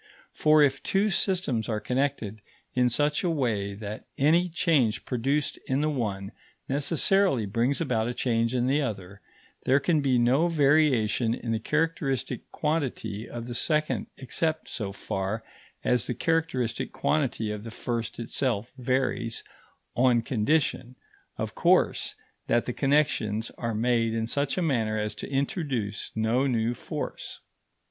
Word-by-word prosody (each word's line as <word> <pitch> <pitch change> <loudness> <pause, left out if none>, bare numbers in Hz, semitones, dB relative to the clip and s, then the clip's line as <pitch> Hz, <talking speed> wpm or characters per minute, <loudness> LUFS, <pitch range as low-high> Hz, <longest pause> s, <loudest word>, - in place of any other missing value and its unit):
For 155 0 +5
if 135 -1 +2
two 200 +2 +1
systems 175 - 0
are 110 -1 0
connected 120 -2 -2 0.3
in 125 -1 +3
such 145 +7 +1
a 180 - +2
way 110 -10 -1
that 105 +1 -7
any 165 +6 +4
change 155 -9 +1
produced 135 +4 -1
in 135 +2 +1
the 155 0 +1
one 100 -7 -3 0.4
necessarily 145 - +2
brings 115 +7 0
about 120 -8 0
a 120 - -2
change 115 0 +1
in 125 -1 +1
the 140 +4 +2
other, 100 -6 -5 0.4
there 135 +2 +4
can 155 +1 +2
be 130 -3 +2
no 130 +8 +3
variation 140 -7 +3
in 115 - -4
the 110 - 0
characteristic 145 -3 -1
quantity 130 -9 -2
of 120 -1 -6
the 120 - -5
second 155 +5 0
except 155 +4 -2
so 105 -5 -4
far 95 +2 -3 0.4
as 125 -3 +2
the 125 - -2
characteristic 130 -5 0
quantity 130 -8 0
of 105 -1 -5
the 115 - -6
first 115 +1 -4
itself 115 -1 -1
varies 125 -2 -1 0.5
on 120 -2 +4
condition, 130 +1 0 0.4
of - - -3
course, - - +2 0.3
that 120 - +2
the 125 - -3
connexions 130 -7 +1
are 115 -2 -3
made 115 0 +1
in 115 0 0
such 140 +6 -1
a 180 - +1
manner 115 -8 +1
as 105 0 -2
to - - -7
introduce 135 - -2
no 115 +5 +2
new 115 -2 +1
force. - - -6
125 Hz, 145 wpm, -27 LUFS, 110-145 Hz, 0.5 s, For